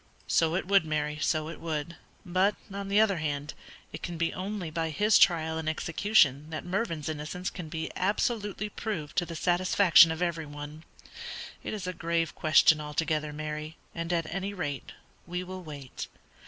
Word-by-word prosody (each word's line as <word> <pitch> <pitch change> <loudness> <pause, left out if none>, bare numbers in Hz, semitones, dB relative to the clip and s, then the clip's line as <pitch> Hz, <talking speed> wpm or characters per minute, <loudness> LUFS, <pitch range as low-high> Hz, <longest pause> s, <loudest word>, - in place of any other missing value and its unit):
"So 165 0 +2
it 185 - -1
would, 195 -3 +5
Mary, 150 -1 -2
so 155 -1 +1
it 165 - -7
would; 160 0 -3 0.3
but, 185 +3 +2 0.2
on 200 0 -4
the 200 +1 +3
other 210 -4 +4
hand, 145 -2 -3 0.4
it - - -6
can 170 -1 -4
be 165 0 0
only 185 -3 -4
by 165 0 -1
his 210 +7 +4
trial 160 -4 +4
and 160 -1 -1
execution 160 -3 +2
that 155 - -5
Mervyn's 180 -5 -2
innocence 155 +4 -4
can 170 -4 -7
be 160 0 -4
absolutely 210 +1 0
proved 200 -8 -4
to 175 - +2
the 165 - -6
satisfaction 175 0 +6
of 160 +2 -1
every 165 -3 -2
one. 145 +2 -8 0.8
It - - -3
is 200 -3 -5
a 185 - -2
grave 165 -1 -1
question 155 0 +5
altogether, 150 0 -1
Mary, 150 +1 -5 0.2
and 165 0 -3
at 170 -2 +1
any 195 +1 -3
rate 145 -7 -4 0.4
we 180 +1 -3
will 185 0 -7
wait. 145 -6 -7
165 Hz, 175 wpm, -29 LUFS, 155-185 Hz, 0.8 s, satisfaction